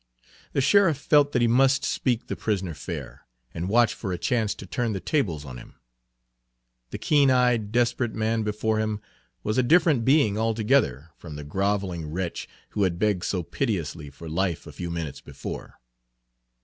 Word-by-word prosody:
The - - +2
sheriff 170 +1 +4
felt 145 0 +3
that 125 -3 +2
he - - +4
must 135 +3 +3
speak 125 -3 0
the - - -4
prisoner 95 -5 -2
fair, - - -7 0.3
and 85 +3 -3
watch 115 -1 +4
for 100 -2 -5
a 90 - -2
chance 110 +4 0
to - - -9
turn 120 -3 -2
the 95 - -3
tables 90 - -1
on 65 -3 -8
him. - - -13 1.1
The - - -5
keen 145 -2 +3
eyed, 125 -5 +2
desperate 120 0 +1
man 110 +1 0
before 110 +1 0
him 110 -1 -1 0.4
was 110 +4 0
a - - +6
different 155 -2 +4
being 130 -6 +3
altogether 110 - +1
from 80 -4 -9
the 75 - -7
groveling 95 0 -1
wretch 85 +2 -4 0.2
who 105 - -3
had 90 -3 +1
begged 100 -2 +1
so 90 -3 -1
piteously 85 - -3
for 80 +4 -11
life 85 +2 -1
a - - -9
few 85 - -6
minutes 85 -4 -5
before. - - -8
105 Hz, 175 wpm, -25 LUFS, 90-125 Hz, 1.1 s, a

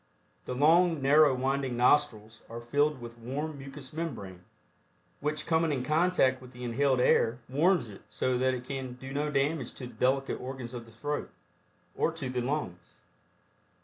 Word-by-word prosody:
The 125 - -4
long 165 +4 +4
narrow 140 0 +5
winding 130 -1 -1
nostrils 120 -5 +2
are 115 +1 -6
filled 145 +4 +1
with 120 0 -10
warm 140 +5 -4
mucous 135 0 -9
membrane, 115 - -5 0.8
which 155 +1 -2
coming 160 -1 +2
in 130 -3 -1
contact 150 -3 +2
with 125 0 -13
the 125 +1 -9
inhaled 130 +2 +1
air 120 -1 +3
Warms 155 - +2
it 100 - -12
so 130 - 0
that 130 0 +2
it 125 0 -7
can 130 -2 -5
do 135 +2 -9
no 150 +1 -1
damage 140 -2 -1
to 130 - -7
the 125 - -10
delicate 135 +1 0
organs 130 -1 -6
of 120 -2 -7
the - - -15
throat, 145 +6 -4 0.7
or - - +1
to 140 -6 -5
the 125 -1 -1
lungs. 120 - -4
135 Hz, 170 wpm, -29 LUFS, 125-150 Hz, 0.8 s, narrow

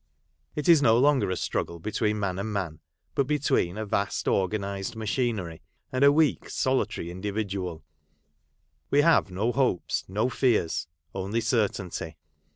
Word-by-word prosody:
It 150 - -3
is 165 -4 +7
no 115 -4 +5
longer 130 -6 +3
a 95 - 0
struggle 85 - -2
between 105 +3 -1
man 95 -2 -2
and 110 +2 -3
man, 90 -6 -3 0.3
but 140 - +1
between 140 - +1
a 110 - -3
vast 100 -1 -1
organised 100 +1 -1
machinery, 110 -6 -2 0.3
and 130 +2 +1
a 140 - +8
weak, 155 0 +2
solitary 130 -10 -1
individual; 95 -3 -4 1.1
we 145 - +4
have 165 - +4
no 100 +6 0
hopes, 125 -8 0
no 105 +6 0
fears 115 - +1
— 75 +1 -46
only 95 +4 -2
certainty. 100 -8 -1
105 Hz, 145 wpm, -27 LUFS, 95-130 Hz, 1.1 s, a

